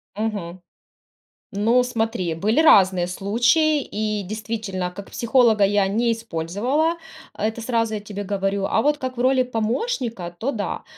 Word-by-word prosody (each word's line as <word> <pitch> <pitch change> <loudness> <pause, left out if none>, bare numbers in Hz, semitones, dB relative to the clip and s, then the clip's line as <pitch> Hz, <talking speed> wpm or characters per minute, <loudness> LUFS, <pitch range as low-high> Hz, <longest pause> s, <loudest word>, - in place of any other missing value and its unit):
Мгм. 200 -5 -4 0.9
Ну, 230 +5 +2
смотри, 225 -8 -2
были 215 - +1
разные 190 - +5
случаи, 240 - +2
и 210 -3 -3
действительно 205 -3 -4
как 195 +2 -10
психолога 235 -3 +3
я 200 0 +3
не 230 +4 +1
использовала, 230 - -1 0.4
это 220 +2 -2
сразу 230 -2 0
я 210 - -2
тебе 205 0 -6
говорю, 195 0 -1
а 220 - +1
вот 295 +1 +2
как 260 -2 -5
в - - -1
роли 260 0 +3
помощника, 230 - -3
то 260 +8 -2
да. 210 -6 -4
220 Hz, 140 wpm, -22 LUFS, 195-245 Hz, 0.9 s, разные